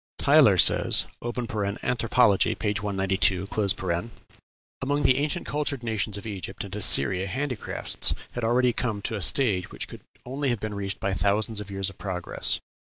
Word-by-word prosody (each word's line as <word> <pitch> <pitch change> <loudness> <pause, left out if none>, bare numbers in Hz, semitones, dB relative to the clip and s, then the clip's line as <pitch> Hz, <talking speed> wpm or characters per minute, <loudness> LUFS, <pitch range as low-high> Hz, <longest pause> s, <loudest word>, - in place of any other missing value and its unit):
Tylor - - +5
says - - +4 0.2
("Anthropology," 115 -1 0
p. 105 - -1
192): 95 -2 0 1.3
"Among 145 +2 0
the 130 -1 +4
ancient 150 0 -2
cultured 145 -3 -3
nations 110 -2 -2
of 100 - -9
Egypt 100 -2 -6
and 100 -1 -7
Assyria 95 -1 +5
handicrafts 130 +2 -1 0.2
had 120 - -5
already 120 +2 +2
come 110 -5 -3
to 115 - -2
a 105 - -4
stage 100 -4 +2
which - - -7
could - - -11 0.2
only 135 +2 -2
have 120 -3 -1
been 110 0 -5
reached 100 -1 -3
by 100 - -2
thousands 105 +2 0
of 105 -1 -7
years 95 -1 -2
of - - -22
progress. 90 -3 0
105 Hz, 150 wpm, -25 LUFS, 100-125 Hz, 1.3 s, Tylor